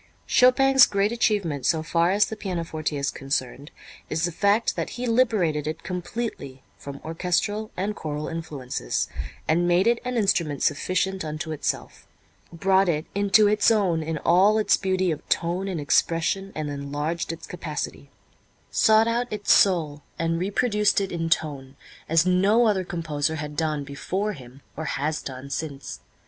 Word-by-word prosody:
Chopin's 265 +1 +5
great 200 +1 +1
achievement 200 - 0
so 160 +2 +1
far 170 +1 +1
as 205 +2 +3
the 220 - -6
pianoforte 165 -6 -3
is 140 0 -1
concerned 135 +1 -4 0.4
is 160 +2 0
the 175 - -2
fact 205 +6 +1
that - - -3
he 250 - -3
liberated 215 - +1
it 155 - -5
completely 180 - -5
from 140 0 -9
orchestral 180 +6 -1
and 200 +3 -2
choral 150 -3 -4
influences, 145 - -3 0.4
and 175 +2 +2
made 175 +2 +3
it 235 0 +3
an 250 0 -2
instrument 170 -9 +1
sufficient 185 +5 0
unto 155 +1 -5
itself, 155 - -4 0.4
brought 190 +2 +2
it 155 -1 0
into 205 +1 +4
its 210 0 +3
own 195 -7 +2
in 160 0 -3
all 190 +7 +4
its 215 - +3
beauty 185 -2 0
of 155 - -6
tone 175 +3 0
and 185 -4 -3
expression 165 +6 +1
and 150 -2 -3
enlarged 145 +4 -3
its 165 - -8
capacity; 155 -4 -6 0.6
sought 220 +1 +4
out 240 +1 -1
its 210 -1 -1
soul 160 -7 +3 0.2
and 165 0 -1
reproduced 210 +2 +1
it 195 -1 -3
in 165 -1 -2
tone, 140 -5 -2 0.3
as 165 +1 +4
no 195 +6 +4
other 200 -4 +2
composer 160 -3 -2
had 150 -1 -6
done 155 -2 -1
before 185 +9 -3
him 130 -3 -13
or 160 - -5
has 150 +2 -2
done 130 0 -8
since. 140 - -5
170 Hz, 160 wpm, -25 LUFS, 150-200 Hz, 0.6 s, Chopin's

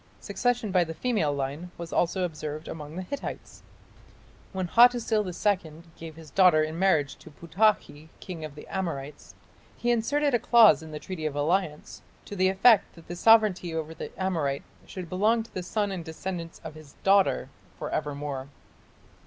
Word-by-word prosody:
Succession 245 -4 -1
by 180 -1 +4
the 160 -1 -7
female 215 -12 0
line 140 +5 -4
was 170 -1 -7
also 180 +2 +1
observed 155 -2 -5
among 150 0 -8
the 185 - -4
Hittites. 280 +9 -7 0.9
When 185 -2 -3
Hattusil 235 0 +4
II 175 -3 -2
gave 160 -1 -10
his 160 -2 -13
daughter 180 -5 +5
in 155 +2 -4
marriage 155 -7 +2
to - - -14
Putakhi, 165 -2 0
king 170 -4 -8
of 155 -2 -7
the 150 - -11
Amorites, 150 -6 -5 0.4
he 240 - 0
inserted 285 +5 +1
a 240 - +3
clause 225 - +6
in 160 - -10
the 155 - -6
treaty 160 -1 -5
of 145 - -5
alliance 155 +1 -1 0.2
"to 205 - -8
the 185 -1 +3
effect 200 +3 +4
that 165 -2 -16
the 175 - -4
sovereignty 195 -5 +4
over 160 0 -4
the - - -7
Amorite 160 -8 -1 0.2
should 185 -2 -7
belong 215 +6 +1
to 225 - -18
the 185 - -3
son 205 +2 -2
and 185 -3 -5
descendants 165 +1 -6
of 160 - -7
his 155 -2 -14
daughter 195 0 +3 0.3
for - - -5
evermore". 145 -2 -4
175 Hz, 170 wpm, -27 LUFS, 155-200 Hz, 0.9 s, clause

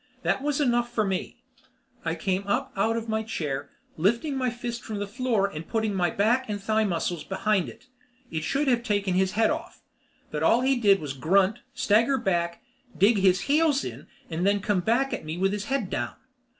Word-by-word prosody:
That - - +1
was 290 0 0
enough 240 -3 +1
for 225 -2 +1
me. 195 +6 -3 0.6
I 165 0 -1
came 190 +3 -2
up 260 +6 -1
out 225 +4 +1
of 230 0 -4
my 220 0 0
chair, 145 -10 -3 0.3
lifting 235 - +1
my 255 -1 0
fist 240 0 -5
from 215 -2 -5
the 205 - -2
floor 225 -1 0
and 165 -4 -7
putting 220 -2 0
my 180 -2 +1
back 230 +7 +1
and 205 -1 -2
thigh 220 +2 +1
muscles 175 -3 -1
behind 195 -1 0
it. - - -14 0.5
It 160 -1 -2
should 280 - 0
have 245 -2 +3
taken 205 -5 0
his 190 +1 +2
head 220 +1 +3
off, - - -6 0.5
but - - -3
all 235 - +4
he 265 +1 +3
did 205 -5 +4
was 145 -3 -4
grunt, 190 - +2 0.2
stagger 230 +6 +3
back, 170 -5 -1 0.3
dig 205 +3 +4
his 190 0 +4
heels 290 +1 +2
in, - - -7 0.2
and 165 +1 -3
then 200 +1 +3
come 200 -1 +1
back 235 +8 +1
at - - -3
me 155 +2 -5
with 195 +2 +1
his 205 0 -3
head 275 +2 -1
down. - - -2
210 Hz, 205 wpm, -26 LUFS, 185-240 Hz, 0.6 s, all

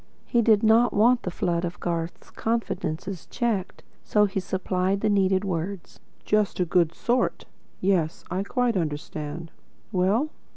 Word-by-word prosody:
He 235 - +2
did 220 -2 +4
not 225 +2 +5
want 235 +4 +5
the - - -3
flood 170 -1 -1
of 175 0 -4
Garth's 170 -1 -4
confidences 190 -5 -3
checked, 225 -7 -2 0.2
so 210 -1 +3
he 195 -1 -2
supplied 185 +1 -1
the 215 - +2
needed 190 -1 +2
words. 185 +1 -4 0.3
"Just 210 -2 +1
a 180 - +3
good 170 -1 +2
sort. 245 +1 0 0.4
Yes, 180 -4 +1
I 185 +1 0
quite 240 +3 0
understand. 155 0 -4 0.4
Well?" 210 +10 +1
190 Hz, 140 wpm, -25 LUFS, 175-215 Hz, 0.4 s, not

